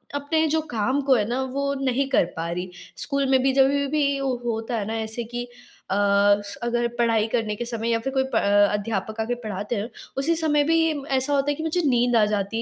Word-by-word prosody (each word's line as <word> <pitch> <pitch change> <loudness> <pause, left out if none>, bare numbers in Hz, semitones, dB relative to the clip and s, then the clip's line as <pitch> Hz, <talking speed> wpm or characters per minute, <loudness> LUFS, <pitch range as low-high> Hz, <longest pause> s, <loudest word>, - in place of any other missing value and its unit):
अपने 315 +3 +1
जो 320 - +2
काम 245 +5 0
को 265 - +6
है 215 -4 +1
ना, 250 +2 -1
वो 280 +2 -2
नहीं 270 +1 +1
कर 270 - +4
पा 165 +1 -3
रही। 180 +1 -4 0.3
स्कूल 280 -1 -1
में 265 -1 +4
भी, 270 +1 +3
जब 270 0 +5 0.2
भी 280 -2 +1
वो 265 -2 0
होता 225 +1 -2
है 205 - -2
ना 220 - -3
ऐसे 220 +2 -4
कि 240 +1 -5 0.5
अ, 195 - +2
स 205 0 +2
अगर 240 0 0
पढ़ाई 225 -2 +2
करने 220 -2 -1
के 240 - -4
समय 230 -1 -3
या 230 -1 +2
फिर 270 +4 -4
कोई 265 - +2
प - - 0
अ, 205 -1 +4
अध्यापक 210 +1 -3
आके 245 +2 -1
पढ़ाते 210 +2 -3
हैं, 210 +2 -3 0.3
उसी 325 +5 +1
समय 300 -3 +2
भी 325 +3 +2
ये 325 -1 +2
म 285 -2 -6
ऐसा 265 +1 0
होता 280 +1 +2
है - - -2
कि 315 - -6
मुझे 325 +2 0
नींद 245 -2 +2
आ 220 -2 +5
जाती 210 +1 -2
240 Hz, 245 wpm, -24 LUFS, 215-275 Hz, 0.5 s, को